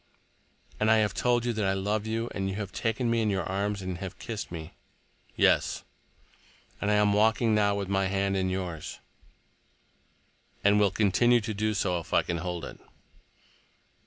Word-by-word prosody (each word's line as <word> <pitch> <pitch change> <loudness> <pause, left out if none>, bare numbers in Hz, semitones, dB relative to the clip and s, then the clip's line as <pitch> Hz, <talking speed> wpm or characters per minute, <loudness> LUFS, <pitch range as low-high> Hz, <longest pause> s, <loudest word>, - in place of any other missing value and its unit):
"And 110 - +2
I 110 - +6
have 105 -2 +1
told 120 +1 +1
you 120 - 0
that 110 -1 -2
I 95 - +2
love 105 +3 -1
you, 115 +1 -1
and 95 -1 -2
you 95 - -4
have 100 -2 -5
taken 115 +2 -1
me 115 -1 +2
in 110 - +1
your 95 -2 0
arms, 100 +1 -2
and 90 -1 -4
have 95 -1 -6
kissed 110 -2 -6
me—" 80 -2 -7 0.6
"Yes." - - +2 1.0
"And 100 - 0
I 105 - +4
am 105 -1 +3
walking 110 +2 +3
now 100 -1 +3
with 100 -1 -3
my 95 0 +1
hand 100 0 0
in 95 -1 0
yours—" 90 -4 -4 1.7
"And 100 +1 +5
will 105 -1 +4
continue 110 +5 +3
to 110 +1 -4
do 110 +1 -1
so, 90 -2 0
if 85 - -4
I - - +4
can 85 - -2
hold 90 0 -4
it." - - -10
100 Hz, 185 wpm, -28 LUFS, 95-110 Hz, 1.7 s, I